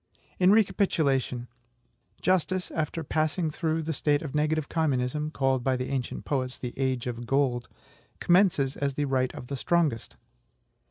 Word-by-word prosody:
In 185 +1 +6
recapitulation: 145 - +2 0.8
Justice, 185 0 +1
after 160 +1 -2
passing 155 +2 0
through 160 +1 -1
the 160 +1 -2
state 145 +1 +1
of 150 - -6
negative 150 0 +1
communism, 150 -1 0
called 135 -4 0
by 130 0 +2
the 125 - -3
ancient 130 -3 -3
poets 130 -3 -2
the 125 -1 -5
AGE 130 -3 -1
OF 120 -1 -5
GOLD, 130 -3 +1 0.5
commences 175 -7 +3
as 140 -1 -2
the 145 - 0
right 130 -2 +1
of - - -7
the 140 - -4
strongest. 150 -4 0
145 Hz, 150 wpm, -27 LUFS, 130-160 Hz, 0.8 s, In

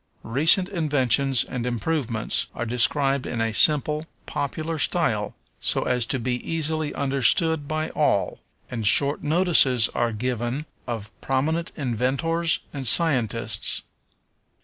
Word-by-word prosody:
Recent 155 - +3
inventions 140 - +1
and 125 -2 -6
improvements 120 -1 -1
are 120 - -4
described 135 +3 0
in 120 - -4
a 115 -1 -1
simple, 150 +4 +4 0.2
popular 155 +3 -4
style, 130 -9 -1 0.2
so - - +1
as 125 -2 0
to 130 - -1
be 125 0 -2
easily 155 -2 -3
understood 140 +3 +1
by 155 +1 -3
all, - - 0 0.3
and 115 -4 -2
short 140 +6 +3
notices 150 -7 +4
are 120 -1 -1
given 120 +5 -3 0.2
of 110 -3 -6
prominent 155 +6 -1
inventors 140 +6 -1 0.2
and 135 -3 -5
scientists. 130 -7 +2
135 Hz, 120 wpm, -23 LUFS, 120-155 Hz, 0.3 s, simple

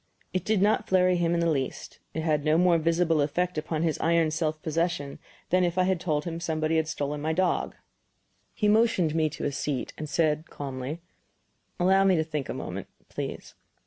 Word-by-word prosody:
It 185 -2 -1
did 210 -3 +2
not 215 +1 +2
flurry 185 -1 +4
him 170 0 +1
in 170 - +1
the 170 - +2
least; 135 -3 -3 0.2
it 160 - -1
had 155 -2 +1
no 155 +1 +3
more 175 -1 +4
visible 165 -1 +2
effect 175 +5 0
upon 155 +1 -2
his 160 -2 0
iron 165 -1 +2
self 155 -1 -1
possession 165 -3 -1 0.3
than 185 +1 +4
if 175 0 0
I 185 - +4
had 185 -1 +1
told 155 -4 -1
him 165 -1 -4
somebody 160 -1 0
had 160 -1 +1
stolen 145 -1 -3
my 160 +2 0
dog. 185 +2 0 0.8
He 210 - +1
motioned 210 -7 +3
me 160 -1 +2
to - - -6
a 145 - 0
seat, 140 -2 -3
and 155 -1 -5
said, 155 0 +1
calmly: 135 +3 -5 0.8
"Allow 190 +2 +4
me 190 -1 +5
to 160 - +2
think 155 -3 -4
a - - -2
moment, - - -5 0.2
please." - - -6
165 Hz, 200 wpm, -27 LUFS, 155-180 Hz, 0.8 s, me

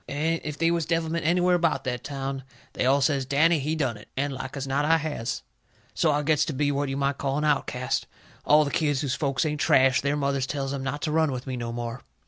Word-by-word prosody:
And 160 +3 -1
if 150 -1 -5
they 165 0 +2
was 170 -3 0
devilment 165 -1 0
anywhere 180 +1 +3
about 170 -2 +1
that 125 -2 -3
town 135 -1 -4 0.3
they 125 - 0
all 140 +2 +4
says, 140 0 +2
"Danny, 150 +5 +3
he 150 +3 -1
done 130 -8 -1
it." 105 - -14
And 140 +1 0
like 130 +2 -6
as 135 - -3
not 135 +2 0
I 165 +2 +4
has. 150 -7 -3 0.5
So 160 - +2
I 145 0 0
gets 150 0 +3
to 155 - -3
be 145 +2 +1
what 140 0 -1
you 135 - -2
might 140 0 0
call 135 0 -1
an 150 - 0
outcast. 130 -4 0 0.4
All 150 +1 +5
the 140 - -3
kids 145 -4 +1
whose 135 -3 -1
folks 140 0 0
ain't 150 -1 -2
trash, 130 0 +4
their 140 +2 0
mothers 140 -2 0
tells 135 -1 -3
'em 140 - -3
not 135 +2 -4
to 155 - -1
run 160 -1 +2
with 125 -1 -5
me 130 -2 -4
no 120 -1 -4
more. 120 +1 -5
140 Hz, 250 wpm, -26 LUFS, 135-155 Hz, 0.5 s, All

